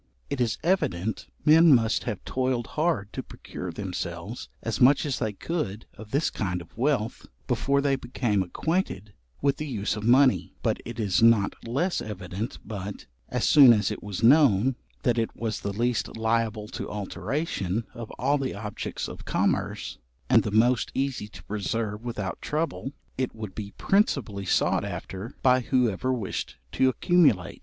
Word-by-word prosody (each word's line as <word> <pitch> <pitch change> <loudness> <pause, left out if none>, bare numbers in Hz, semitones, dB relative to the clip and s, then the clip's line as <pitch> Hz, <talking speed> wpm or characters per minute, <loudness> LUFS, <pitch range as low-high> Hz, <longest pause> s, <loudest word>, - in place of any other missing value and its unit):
It 135 - -1
is 115 -3 +1
evident 110 - 0 0.2
men 160 -1 +8
must 115 -2 +1
have 100 - -4
toiled 130 -2 0
hard 155 - 0
to - - -3
procure 90 -1 -8
themselves 90 +3 -5
as 115 +1 -2
much 135 +4 +6
as 140 -4 -1
they 110 -3 -1
could 110 - -4
of 110 -1 -11
this 140 +6 +1
kind 90 -3 -2
of 85 - -13
wealth, 120 -3 -1 0.2
before 140 0 +1
they 140 -1 +2
became 120 -5 -1
acquainted 105 - -2 0.3
with 140 -1 +2
the 155 - -4
use 105 -6 -2
of 105 - -5
money; 120 - +4
but - - +1
it 120 0 -7
is 100 -3 +1
not 115 -3 +5
less 170 +10 0
evident 100 +1 -5
but, 100 -1 -6 0.2
as - - 0
soon 135 -5 +9
as 110 -1 +1
it 105 - -5
was 105 +1 -5
known, 130 -3 +5 0.3
that 120 -1 +2
it 115 - -2
was 110 -3 -3
the 100 - -3
least 115 +2 -1
liable 110 -1 0
to - - -5
alteration 105 - -2
of 115 -2 -7
all 140 +4 +2
the 130 -5 -2
objects 105 0 -5
of - - -9
commerce, - - -1 0.3
and - - +7
the - - -3
most 115 +3 +3
easy 135 -6 -1
to 105 - -13
preserve 105 +1 -3
without 105 -6 -4
trouble, 150 -3 -2 0.3
it 130 -3 -1
would 110 -4 -7
be 100 -2 -7
principally 140 - +1
sought - - +2
after 100 +7 -6
by 130 -1 +5
whoever 125 -1 +1
wished 115 -7 -3
to 130 - +3
accumulate. 130 - +2
115 Hz, 165 wpm, -26 LUFS, 105-135 Hz, 0.3 s, soon